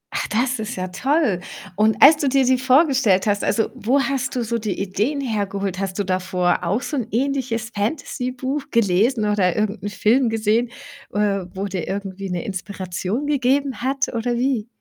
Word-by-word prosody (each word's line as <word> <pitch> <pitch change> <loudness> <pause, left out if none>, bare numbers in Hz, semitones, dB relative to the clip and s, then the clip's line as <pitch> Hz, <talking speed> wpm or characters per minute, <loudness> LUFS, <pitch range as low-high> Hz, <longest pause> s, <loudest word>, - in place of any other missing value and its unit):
Ach, - - -1
das 245 +2 0
ist 220 +2 -4
ja 185 0 -4
toll. 260 - +1 0.4
Und 215 +1 +3
als 295 +2 +9
du 295 - 0
dir 270 0 +3
die 255 0 +3
vorgestellt 255 - +3
hast, 205 -1 +1
also, 225 - +1
wo 255 +6 +1
hast 270 -1 -1
du 245 - 0
so 235 +1 -2
die 215 -3 -3
Ideen 210 +9 -1
hergeholt? 200 -5 -2
Hast 195 -1 -3
du 205 - 0
davor 185 -1 0
auch 200 +9 0
so 295 - -3
'n 240 -4 -2
ähnliches 240 -2 -1
Fantasy-Buch 255 +4 -2
gelesen 215 +2 +2
oder 195 -4 +2
irgend 215 0 -1
'n 205 - -3
Film 230 +5 +2
gesehen, 225 +2 +1 0.4
äh, 200 -3 0
wo 195 +1 -2
dir 190 -4 -4
irgendwie 195 -1 -4
'ne 180 -2 -3
Inspiration 190 +4 -4
gegeben 275 -3 +1
hat, 265 +1 -1
oder 240 +1 -1
wie? 240 -3 0
220 Hz, 180 wpm, -21 LUFS, 195-260 Hz, 0.4 s, als